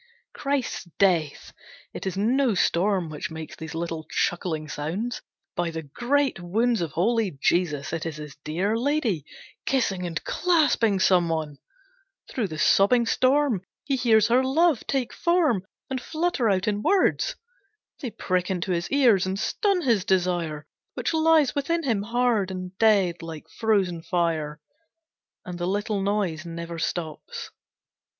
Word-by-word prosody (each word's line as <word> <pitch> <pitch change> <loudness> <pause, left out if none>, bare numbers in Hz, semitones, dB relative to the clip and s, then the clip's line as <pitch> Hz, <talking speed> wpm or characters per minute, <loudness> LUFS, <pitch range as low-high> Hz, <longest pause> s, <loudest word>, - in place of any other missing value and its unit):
Christ's 275 -8 -2
Death! 170 -7 +1 0.4
It - - -5
is 190 - -3
no 240 +3 +2
storm 180 -1 +1
which 155 +1 -5
makes 160 -1 -8
these 160 0 -8
little 165 -2 -4
chuckling 160 -3 -1
sounds. 175 - -3 0.3
By 175 -1 0
the 160 -1 -5
Great 255 - 0
Wounds 220 +5 +1
of 165 -4 -3
Holy 210 -3 +1
Jesus, 155 -3 0
it 165 0 -2
is 160 - -5
his 150 -2 -9
dear 175 +9 -1
lady, 235 - 0 0.4
kissing 195 -9 0
and 165 -2 -3
clasping 300 - +2
someone! 165 -6 +1 0.7
Through 230 -6 -1
the 155 -3 -7
sobbing 205 +9 +4
storm 255 -3 +2 0.2
he 275 -1 0
hears 230 -4 +4
her 250 +2 +4
love 300 +1 +2
take 265 -3 -1
form 315 - +1 0.2
and 260 -1 -3
flutter 315 -6 0
out 190 0 +1
in 205 -1 0
words. 390 - +2 0.6
They 260 - -4
prick 185 -4 -1
into 185 0 -2
his 170 -1 -1
ears 235 -10 +4
and 190 +1 -2
stun 390 - 0
his 230 -8 +2
desire, 175 -5 0 0.3
which - - -1
lies 320 -3 +4
within 335 +4 -1
him, 230 -8 +1
hard 230 -2 +1
and 185 0 -6
dead, 200 -6 +3
like 165 -2 -8
frozen 195 -7 0
fire. 165 -3 -1 0.9
And 180 -1 -6
the 175 - -1
little 205 +1 -1
noise 195 -5 -1
never 170 0 -6
stops. 160 -2 -4
195 Hz, 145 wpm, -25 LUFS, 170-245 Hz, 0.9 s, sobbing